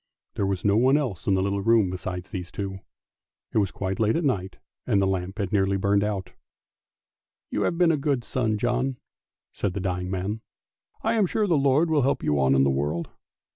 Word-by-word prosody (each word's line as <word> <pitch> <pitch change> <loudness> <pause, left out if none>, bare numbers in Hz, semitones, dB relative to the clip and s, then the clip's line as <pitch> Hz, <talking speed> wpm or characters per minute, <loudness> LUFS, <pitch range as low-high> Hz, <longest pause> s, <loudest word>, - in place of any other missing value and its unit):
There 100 - -1
was 95 0 -2
no 100 0 +4
one 130 +4 +5
else 120 - -3
in 100 - +4
the 95 - +1
little 100 0 -1
room 110 -3 +3
besides 90 0 -5
these 90 -2 -5
two; 95 -1 -5 0.7
it - - +3
was 100 -3 +1
quite 95 +2 -4
late 110 0 +2
at 170 - 0
night 95 -10 -1 0.3
and 100 - +3
the 100 - +3
lamp 95 +1 -2
had 100 -3 -2
nearly 100 -1 +2
burnt 100 +1 +2
out. 100 -3 -2 0.6
" - - -68
You - - -1
have 170 - 0
been 175 -2 +4
a 155 - +1
good 140 -4 0
son, 115 -4 -1
John," 125 +3 0 0.6
said 100 - -2
the - - -1
dying 90 -1 -2
man. 95 +4 -3 0.3
" - - -40
I 225 - +2
am 215 -4 +3
sure 215 +4 0
the 175 -5 +2
Lord 140 +3 +3
will 150 -2 +3
help 135 +2 +1
you 75 -1 +1
on 65 0 +4
in 65 - +4
the 70 - +3
world! 75 +5 -2
100 Hz, 220 wpm, -25 LUFS, 95-130 Hz, 0.7 s, one